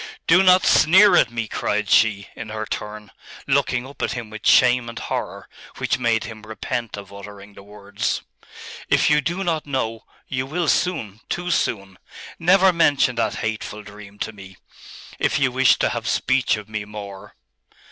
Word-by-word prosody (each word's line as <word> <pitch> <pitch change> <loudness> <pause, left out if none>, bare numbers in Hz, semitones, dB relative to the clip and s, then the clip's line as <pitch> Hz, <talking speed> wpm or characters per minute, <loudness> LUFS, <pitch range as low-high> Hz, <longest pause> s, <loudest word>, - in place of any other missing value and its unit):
'Do 175 +3 +5
not 185 -1 +5
sneer 190 +6 +6
at 120 - +4
me!' 115 -1 -4
cried 105 0 -2
she, 100 -1 +3
in 110 - -8
her 110 0 -4
turn, 105 0 -7 0.3
looking 125 0 0
up 140 +2 -12
at - - -1
him 115 -3 -7
with 110 0 -5
shame 125 -1 +4
and 115 - -9
horror, - - -5 0.3
which - - -1
made 115 -2 +1
him 115 -3 -9
repent 110 +1 -5
of 100 -1 -10
uttering 100 0 -11
the - - -13
words. 100 +1 -4 0.7
'If - - +3
you 150 0 +4
do 175 +6 -3
not 160 -4 -2
know 115 -5 -3 0.2
you 130 0 -3
will 170 +3 -2
soon, 110 - -1
too 175 0 -3
soon! 100 - -2 0.4
Never 185 +2 +4
mention 145 -6 +3
that 115 - 0
hateful 105 -1 -4
dream 105 0 -13
to 110 - -4
me, 95 -2 -13 0.6
if - - +1
you 135 -3 +1
wish 130 +1 +4
to - - +1
have - - -4
speech 105 - +1
of 105 -1 -9
me 110 -1 -4
more! 100 -1 -10
110 Hz, 175 wpm, -22 LUFS, 105-140 Hz, 0.7 s, sneer